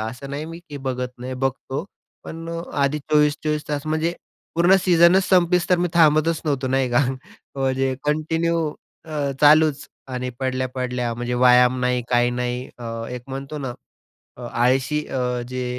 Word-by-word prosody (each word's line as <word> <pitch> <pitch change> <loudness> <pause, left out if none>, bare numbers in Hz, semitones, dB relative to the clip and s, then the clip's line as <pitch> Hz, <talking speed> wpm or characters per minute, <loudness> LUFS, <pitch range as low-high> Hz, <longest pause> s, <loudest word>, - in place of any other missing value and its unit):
असं 125 +5 -6
नाही 145 +2 -4
मी 165 +1 -8
की 145 - -7
बघत 125 -1 -2
नाही, 130 +1 -5
बघतो, 135 +3 -3 0.4
पण 165 +1 -7
अ, 165 0 -4 0.2
आधी 145 +2 +1
24-24 150 0 +1
तास. 145 0 -3
म्हणजे 160 +2 0 0.4
पूर्ण 175 +3 +5
सीजनच 175 +1 +5
संपेस्तोर 180 -1 +3
मी 175 0 +1
थांबतच 160 0 +4
नव्हतो, 140 -3 -1
नाही 130 0 +1
का? 120 - +3 0.6
म्हणजे 135 0 0
कंटिन्यू 160 +3 0 0.4
अ, 150 -3 -2
चालूच 150 0 +5 0.3
अ, - - -8
आणि 125 0 -3
पडल्या-पडल्या, 130 -2 -2
म्हणजे 120 +1 -3
व्यायाम 125 0 +5
नाही, 125 0 +1
काही 120 0 +3
नाही. 125 +1 -3
अ, 120 - -8 0.3
एक 125 -1 -6
म्हणतो 135 +3 -6
ना, 130 -3 -4 0.7
अ, - - -11
आळशी 130 +5 +1
अ, 125 -1 -2
जे 130 0 -3
135 Hz, 155 wpm, -22 LUFS, 125-155 Hz, 0.7 s, पूर्ण